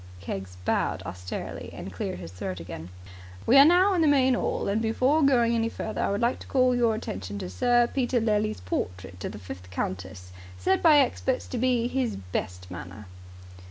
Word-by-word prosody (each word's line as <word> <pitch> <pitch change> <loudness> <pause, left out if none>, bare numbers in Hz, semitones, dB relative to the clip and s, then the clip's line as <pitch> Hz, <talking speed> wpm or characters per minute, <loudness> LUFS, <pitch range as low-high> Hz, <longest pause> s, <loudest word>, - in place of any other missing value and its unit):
Keggs 95 0 -6
bowed - - 0
austerely, 90 0 -6
and - - -8
cleared - - -4
his 85 -2 -8
throat 90 0 -5
again. 85 0 -8 0.6
"We 245 - +4
are 280 - +10
now 365 +5 +5
in 355 - +2
the 315 - +4
main 265 -3 +4
'all, - - -1
and 205 +3 +1
before 255 +7 +2
going 245 -5 +4
any 230 -1 +1
further 220 - -4
I - - +1
would 200 +3 -1
like 240 +2 +1
to - - -11
call 255 -2 +3
your 235 -2 +2
attention 100 - -5
to 90 -2 -5
Sir 240 - +3
Peter 245 0 0
Lely's 215 - 0
portrait 90 0 -4
of - - -3
the 105 - -8
fifth 90 -1 -9
countess. 90 0 -5 0.3
Said 90 - +1
by 310 -3 +7
experts 260 -1 +1
to 245 - -3
be 250 -1 +2
in 240 - -1
his 255 -3 0
best 90 -1 -5
manner." 90 +4 -8
215 Hz, 195 wpm, -27 LUFS, -, 0.6 s, are